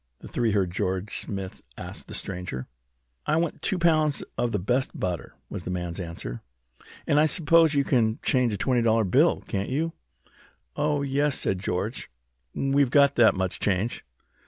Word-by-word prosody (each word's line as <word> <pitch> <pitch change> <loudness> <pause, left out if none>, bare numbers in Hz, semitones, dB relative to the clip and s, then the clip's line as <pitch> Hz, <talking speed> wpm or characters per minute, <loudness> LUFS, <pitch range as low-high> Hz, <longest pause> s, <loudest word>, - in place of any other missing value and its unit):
the - - -11
three 120 -2 0
heard 95 -4 +1
George 95 +1 -2
Smith 95 -2 -6 0.2
ask - - -8
the - - -6
stranger. 90 -9 -5 0.6
"I 155 - +3
want 165 0 -1
two 190 - 0
pounds 155 -4 +2
of 120 - 0
the 105 - +1
best 125 +8 -1
butter," 90 -2 -3
was - - -6
the - - -6
man's 90 0 -3
answer. 85 -9 -6 0.6
"And 145 - +3
I 155 - +5
suppose 160 0 +4
you 140 - +3
can 115 -5 +2
change 125 -3 +2
a 105 - -2
twenty 125 +4 +1
dollar 115 -1 +3
bill, 95 - +3
can't 100 0 -3
you?" 160 +5 -1 0.8
"Oh, 150 -1 0
yes," 140 +1 +1
said 95 - 0
George. 100 +5 -3 0.5
"We've 135 -1 +2
got 140 +1 +5
that 120 -4 +5
much 95 -1 -2
change." 100 +4 -1
115 Hz, 170 wpm, -26 LUFS, 95-145 Hz, 0.8 s, I